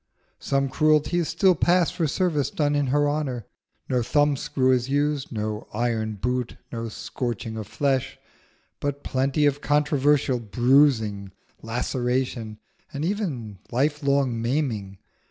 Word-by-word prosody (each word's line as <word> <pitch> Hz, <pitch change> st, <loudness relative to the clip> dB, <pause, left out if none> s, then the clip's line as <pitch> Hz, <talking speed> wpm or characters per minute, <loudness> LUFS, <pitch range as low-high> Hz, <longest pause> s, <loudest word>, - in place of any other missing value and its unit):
Some 135 Hz, 0 st, 0 dB
cruelties 155 Hz, +4 st, +2 dB
still 190 Hz, -3 st, +4 dB
pass 175 Hz, +1 st, +3 dB
for 165 Hz, -3 st, -1 dB
service 150 Hz, -2 st, 0 dB
done 145 Hz, -1 st, 0 dB
in 145 Hz, -1 st, +1 dB
her 145 Hz, +3 st, +2 dB
honour: 140 Hz, -6 st, -2 dB, 0.4 s
no 125 Hz, -1 st, +1 dB
thumb 145 Hz, +4 st, +2 dB
screw 130 Hz, -1 st, +1 dB
is 125 Hz, 0 st, +1 dB
used, 145 Hz, 0 st, 0 dB
no 105 Hz, -2 st, -4 dB
iron 110 Hz, -2 st, -1 dB
boot, 125 Hz, +4 st, -2 dB
no 115 Hz, -1 st, -4 dB
scorching 115 Hz, 0 st, -4 dB
of 110 Hz, -2 st, -5 dB
flesh; 135 Hz, +1 st, -1 dB, 0.6 s
but 145 Hz, 0 st, -3 dB
plenty 135 Hz, +3 st, +1 dB
of 145 Hz, 0 st, +1 dB
controversial 145 Hz, -3 st, +2 dB
bruising, 110 Hz, -3 st, +2 dB, 0.3 s
laceration, 120 Hz, -1 st, -2 dB, 0.3 s
and 145 Hz, +2 st, -3 dB
even 145 Hz, -, -3 dB
lifelong 140 Hz, -2 st, +1 dB
maiming. 115 Hz, -7 st, -2 dB
135 Hz, 125 wpm, -25 LUFS, 115-145 Hz, 0.6 s, still